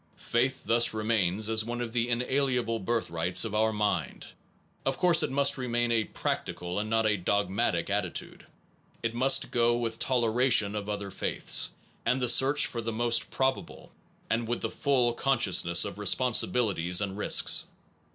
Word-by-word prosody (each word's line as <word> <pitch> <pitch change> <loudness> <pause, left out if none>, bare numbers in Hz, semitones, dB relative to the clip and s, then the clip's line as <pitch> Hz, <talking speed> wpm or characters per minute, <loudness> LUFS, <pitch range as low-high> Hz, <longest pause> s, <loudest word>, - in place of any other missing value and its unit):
Faith 130 +3 -1
thus 115 -1 +3
remains 110 -2 0
as 110 0 0
one 120 +2 -5
of 120 -2 -5
the 120 0 0
inalienable 125 -1 -1
birth 110 -2 -2
rights 85 +5 0
of 110 - -5
our 110 +1 +2
mind. 105 - -2 0.6
Of 135 - -1
course 175 -2 +4
it - - -1
must 140 0 +2
remain 120 -1 -1
a 110 -2 +1
practical, 90 0 -4
and 105 +1 -4
not 110 0 +1
a 105 -1 +2
dogmatic 100 -1 -1
attitude. 100 -4 -3 0.6
It 115 0 -2
must 130 +3 +2
go 120 0 +2
with 115 -1 -4
toleration 120 -3 +2
of 105 0 -5
other 100 -1 -4
faiths, - - 0 0.3
with 125 - 0
the 125 -2 0
search 135 +4 +4
for 120 - -5
the 115 0 -4
most 120 +1 0
probable, 130 0 -3 0.4
and 115 0 -1
with 120 +1 -3
the 115 - -2
full 125 -4 +1
consciousness 95 -10 +2
of 95 - -7
responsibilities 105 -5 +2
and 100 -2 -2
risks. 105 - +1
115 Hz, 160 wpm, -28 LUFS, 105-125 Hz, 0.6 s, course